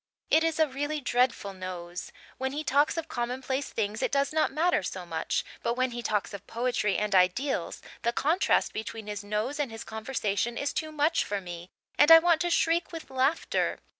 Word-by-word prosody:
It 320 - +5
is 325 -1 0
a 315 - +5
really 290 +3 -3
dreadful 245 -6 +1
nose. 180 -1 -6 0.3
When 265 0 -2
he 300 +2 -3
talks 285 +3 +2
of 330 -1 -3
commonplace 260 +1 -3
things 215 0 -2
it - - 0
does 280 +1 +1
not 315 0 +2
matter 335 +5 +2
so - - -5
much, - - -2 0.2
but 235 - 0
when 255 0 +1
he 240 0 -4
talks 210 -2 -1
of 200 0 -8
poetry 235 -4 0
and 210 -1 -1
ideals 190 +10 +1 0.2
the 235 - +1
contrast 315 +10 +2
between 220 0 -5
his 210 -1 -5
nose 215 +8 -2
and 285 -3 0
his 225 0 -7
conversation 220 0 -2
is 285 - -1
too 310 0 -3
much 305 +2 +2
for 205 0 -2
me 175 -1 -8 0.3
and 290 - +7
I 325 - +13
want 330 -1 +3
to 350 - +1
shriek 335 0 +2
with 330 -4 -8
laughter. 265 +5 +1
255 Hz, 195 wpm, -28 LUFS, 210-305 Hz, 0.3 s, I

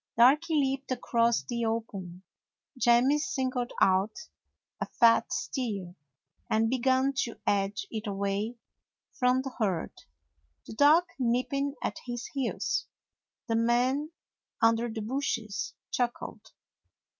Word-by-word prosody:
Darky 290 +7 +5
leaped 275 -2 0
across 235 -2 +1
the 235 -1 -3
open; 195 -6 -4 0.5
Jemmy 255 +3 +4
sin 270 -2 -1
gled 245 -1 -2
out 190 +3 +3 0.6
a - - -1
fat 230 -1 +4
steer, 205 -9 -3 0.6
and 225 +1 +2
began 260 +2 +2
to 235 -3 -1
edge 200 0 0
it 220 0 -4
away 200 +3 -2 0.6
from 255 -1 +2
the 270 -2 -6
herd, 190 -7 0 0.7
the - - -9
dog 295 +8 +6 0.2
nipping 265 +3 0
at - - -2
its 240 0 -4
heels. 270 -4 -1 0.6
The 225 - 0
man 245 +6 +2 0.5
under 230 +1 +3
the 220 0 -5
bushes 220 -4 -2 0.2
chuckled. 245 -1 -3
240 Hz, 115 wpm, -29 LUFS, 220-265 Hz, 0.7 s, dog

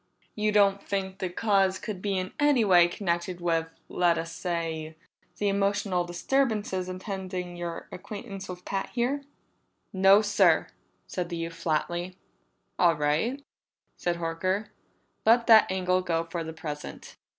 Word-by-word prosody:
"You 215 0 0
don't 200 -1 +4
think 190 -1 -3
the 185 - -2
cause 195 0 +2
could 205 -2 -6
be 200 -1 -1
in 185 0 -3
any 290 -6 +4
way 175 -3 +6
connected 175 -1 -2
with, 165 -2 0 0.2
let 175 -2 +2
us 165 0 -4
say, 165 -2 -3 0.4
the 205 - 0
emotional 200 -2 +1
disturbances 205 -1 0
attending 185 -1 -5
your 175 -1 -5
acquaintance 195 0 -8
with 180 0 -8
Pat 195 -1 -2
here?" 255 +4 0 0.7
"No, 195 +2 +6
sir," 195 -5 +3 0.4
said 175 -1 -4
the 170 - -4
youth 165 0 -4
flatly. 175 +3 -2 0.6
"All 170 -2 +5
right," 155 - 0 0.5
said 175 -1 -1
Horker. 185 +5 -2 0.5
"Let 230 +2 +5
that 220 -4 +7
angle 185 -1 +1
go 165 -2 0
for 165 0 -4
the 160 - -6
present. 155 -2 -7
185 Hz, 140 wpm, -27 LUFS, 170-200 Hz, 0.7 s, that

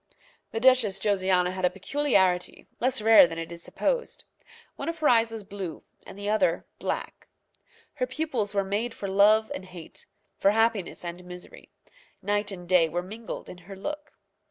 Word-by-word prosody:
The 225 - -2
Duchess 240 -6 +4
Josiana 185 -3 +2
had 185 0 -5
a 180 - +5
peculiarity, 190 -3 0
less 255 -2 0
rare 220 -4 +8
than 165 - -7
it 165 0 -5
is 170 0 -6
supposed. - - -2 0.5
One - - -4
of 335 - -4
her 310 -2 +1
eyes 230 -1 +4
was 225 -2 -7
blue 195 -4 -7 0.2
and - - -10
the 205 0 -5
other 215 +6 +1
black. - - -4 0.7
Her - - -2
pupils 245 - -2
were 200 - +2
made 210 +5 -2
for 200 - -5
love 210 +3 +4
and 185 - -6
hate, 180 -3 -11 0.3
for 195 - +4
happiness 220 -4 0
and 175 +1 -6
misery. 180 0 -11 0.5
Night 205 0 0
and 180 -2 -8
day 175 -3 +4
were 175 +3 -2
mingled 220 +5 -7
in 180 - -10
her 195 - -7
look. 295 +9 -6
200 Hz, 175 wpm, -27 LUFS, 180-230 Hz, 0.7 s, rare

